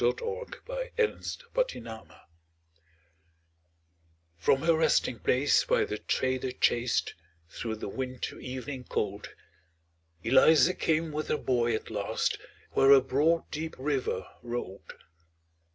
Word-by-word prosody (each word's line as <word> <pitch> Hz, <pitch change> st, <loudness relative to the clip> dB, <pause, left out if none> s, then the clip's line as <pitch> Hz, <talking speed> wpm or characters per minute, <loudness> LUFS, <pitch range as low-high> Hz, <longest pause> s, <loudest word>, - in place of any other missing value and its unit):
ELIZA -, -, +3 dB
CROSSING 485 Hz, 0 st, -3 dB, 0.6 s
THE 115 Hz, -, -7 dB
RIVER 110 Hz, -, -12 dB, 2.1 s
From 85 Hz, +11 st, +2 dB
her 165 Hz, 0 st, +4 dB
resting 160 Hz, -6 st, +2 dB
place 135 Hz, +3 st, +3 dB
by -, -, +2 dB
the 105 Hz, -, -4 dB
trader 130 Hz, 0 st, -1 dB
chased, 120 Hz, -1 st, +1 dB, 0.4 s
Through 110 Hz, +5 st, -4 dB
the 110 Hz, -, -6 dB
winter 130 Hz, +3 st, -5 dB
evening 130 Hz, 0 st, -6 dB
cold, 100 Hz, 0 st, -3 dB, 0.9 s
Eliza 150 Hz, +8 st, +6 dB
came 160 Hz, -1 st, 0 dB
with 150 Hz, +1 st, -3 dB
her -, -, +1 dB
boy 120 Hz, -4 st, +1 dB
at -, -, -6 dB
last, -, -, -1 dB, 0.3 s
Where 135 Hz, -, +5 dB
a 140 Hz, -, +10 dB
broad 150 Hz, +6 st, +1 dB
deep 160 Hz, +1 st, -4 dB
river 135 Hz, 0 st, -1 dB, 0.2 s
rolled. 120 Hz, -5 st, -6 dB
130 Hz, 115 wpm, -29 LUFS, 120-160 Hz, 2.1 s, a